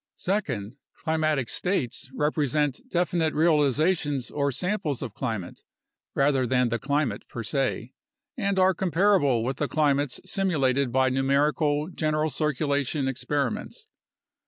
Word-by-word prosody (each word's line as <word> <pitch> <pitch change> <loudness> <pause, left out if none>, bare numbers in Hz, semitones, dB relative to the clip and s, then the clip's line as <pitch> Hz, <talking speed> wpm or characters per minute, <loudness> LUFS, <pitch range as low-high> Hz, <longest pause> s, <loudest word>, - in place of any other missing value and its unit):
Second, 140 - -2 0.2
climatic 155 -5 0
states 135 - -2
represent 150 -1 0
definite 170 -2 0
realizations 150 -2 +2
or 140 -1 0
samples 175 - -2
of 110 - -6
climate 110 -7 -4 0.5
(rather 135 -2 +2
than 125 0 +2
the 115 0 -1
climate 140 -6 -1
per 115 - -5
se) 130 0 -2 0.4
and 200 -5 -1
are 190 0 +5
comparable 175 - +2
with 130 +2 -2
the 145 - -1
climates 145 -3 +1
simulated 140 -9 +1
by 130 +1 +3
numerical 145 +3 +1
general 155 -3 -1
circulation 145 -1 0
experi 135 0 -1
ments. - - -9
145 Hz, 120 wpm, -26 LUFS, 130-155 Hz, 0.5 s, are